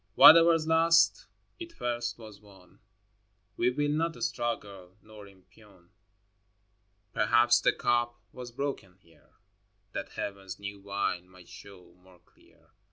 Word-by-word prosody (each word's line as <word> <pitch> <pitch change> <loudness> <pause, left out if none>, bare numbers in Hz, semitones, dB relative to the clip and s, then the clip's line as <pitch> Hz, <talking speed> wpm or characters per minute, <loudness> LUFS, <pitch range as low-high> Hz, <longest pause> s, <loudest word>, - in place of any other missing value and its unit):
XXII. 105 +2 -44
Whatever's 165 0 +7
lost, 165 - +3 0.3
it 340 -1 -9
first 120 - -4
was 110 -3 -13
won: 95 -3 -20 0.8
We 120 - +1
will 145 +3 -1
not 165 +2 -1
struggle 100 - -5
nor 105 -1 -14
impugn. 95 -1 -22 1.2
Perhaps 120 +2 +3
the - - +3
cup 120 0 -1
was 125 -1 -9
broken 125 -8 -5
here, 85 -3 -27 0.6
That - - -7
Heaven's 95 -2 -7
new 100 0 -8
wine 100 -2 -4
might 90 -1 -18
show 95 -2 -15
more 90 0 -21
clear. 85 - -28
105 Hz, 125 wpm, -28 LUFS, 95-125 Hz, 1.2 s, Whatever's